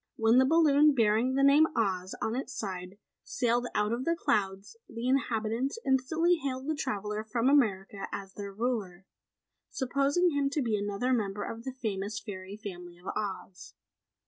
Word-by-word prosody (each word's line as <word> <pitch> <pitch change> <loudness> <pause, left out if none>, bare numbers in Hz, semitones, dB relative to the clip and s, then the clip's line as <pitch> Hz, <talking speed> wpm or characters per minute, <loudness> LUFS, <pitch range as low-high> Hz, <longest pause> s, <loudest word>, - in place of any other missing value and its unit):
When 225 +2 +4
the 260 - +5
balloon 300 -2 +5
bearing 230 +2 +2
the 275 - +2
name 290 +3 +6
OZ 190 -5 -1
on 220 - -1
its 265 +1 -4
side 185 -1 -5 0.3
sailed 240 -1 0
out 210 +2 +1
of 240 +2 -2
the 335 +4 +1
clouds, 200 - -1
the 230 +2 -4
inhabitants 250 - 0
instantly 320 +7 +2
hailed 270 -3 -4
the 310 - 0
traveller 210 -7 -3
from 230 +3 -1
America 205 -8 +2
as 195 -1 -6
their 200 -1 -6
ruler, 200 -5 -3 0.6
supposing 280 +7 +1
him 285 -2 +1
to 295 - +1
be 225 -3 0
another 205 +5 -1
member 205 -3 -1
of 230 +1 -7
the 260 - -3
famous 205 0 -2
fairy 195 -1 -8
family 180 -4 -9
of 175 - -20
Oz. 195 -3 -5
230 Hz, 165 wpm, -30 LUFS, 200-270 Hz, 0.6 s, name